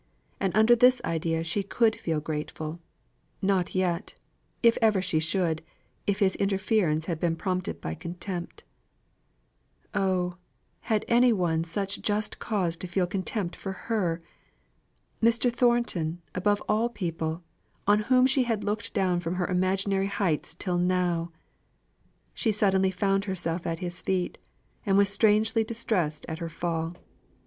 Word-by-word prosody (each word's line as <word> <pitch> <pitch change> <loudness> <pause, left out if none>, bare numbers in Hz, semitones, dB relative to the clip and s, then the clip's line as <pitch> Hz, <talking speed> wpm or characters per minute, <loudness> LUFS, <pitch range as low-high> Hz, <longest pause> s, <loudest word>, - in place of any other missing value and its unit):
And 195 - 0
under 220 +2 +6
this 250 +2 +5
idea 165 0 -1
she 175 +5 0
could 220 +3 +2
feel 160 -2 -2
grateful 155 +1 -5 0.6
not 190 -2 0
yet, 180 0 -1 0.5
if 230 0 +6
ever 215 -3 +4
she 185 -4 0
should, 165 -1 0 0.5
if 200 -1 +1
his 195 -3 +2
interference 195 -5 +1
had 165 -3 -3
been 165 -1 +1
prompted 185 - -2
by 80 -1 -4
contempt. 175 - -6 1.3
Oh! 185 -3 0 0.4
had 215 -2 -1
any 240 +1 +5
one 175 -6 +1
just 200 +4 -2
cause 185 -7 -1
to 185 - -5
feel 180 +1 +1
contempt 185 0 -2
for 195 - -5
her? 185 -5 -2 1.0
Mr. 230 +1 +3
Thornton, 235 -10 +1
above 205 +3 +1
all 220 +3 +2
people, 165 -5 -3 0.4
on 205 +1 +4
whom 255 +4 +4
she 265 +1 +3
had 225 -4 -1
looked 210 +2 -3
down 185 -3 +2
from 175 +1 -3
her 180 -1 0
imaginary 190 +2 +1
heights 180 -5 -1
till 180 0 -1
now! 175 -2 +1 1.0
She 225 - +1
suddenly 195 -2 +2
found 195 +1 0
herself 175 -3 -2
at 165 0 -1
his 175 0 -3
feet, 185 -2 -1 0.4
and 195 -1 +2
was 200 0 +5
strangely 220 +2 +3
distressed 215 -9 -1
at 160 0 -5
her 170 -1 -4
fall. 165 0 -3
190 Hz, 140 wpm, -27 LUFS, 170-210 Hz, 1.3 s, under